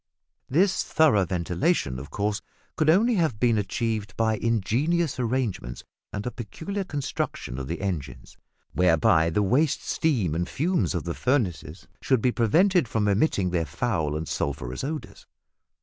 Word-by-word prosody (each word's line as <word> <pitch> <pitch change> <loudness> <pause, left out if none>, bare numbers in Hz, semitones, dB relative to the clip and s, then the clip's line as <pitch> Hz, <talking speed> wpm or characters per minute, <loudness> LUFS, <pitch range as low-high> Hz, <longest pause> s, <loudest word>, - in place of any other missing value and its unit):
This 185 +7 +3
thorough 140 -12 +3
ventilation, 85 - 0
of 70 +1 -9
course, 105 +5 -2 0.3
could 155 -1 +2
only 215 +7 +4
have 155 - 0
been 115 -2 +3
achieved 105 -1 -2
by 110 -1 +2
ingenious 130 - 0
arrangements 115 - -2 0.3
and 100 - -5
a 125 - -2
peculiar 165 - -5
construction 140 - -4
of 65 - -5
the 85 +4 -4
engines, 90 -8 -5 0.4
whereby 80 -2 +4
the 105 +6 +1
waste 135 +9 +2
steam 115 - 0
and 85 +2 -2
fumes 170 - 0
of 85 - -2
the 85 - -3
furnaces 95 - -1
should 130 -3 +2
be 125 +3 +2
prevented 160 - +3
from 110 -2 0
emitting 100 - +2
their 85 -2 +1
foul 80 - -1
and 80 0 -5
sulphurous 65 -2 -3
odours. 150 +2 -6
110 Hz, 150 wpm, -26 LUFS, 85-145 Hz, 0.4 s, only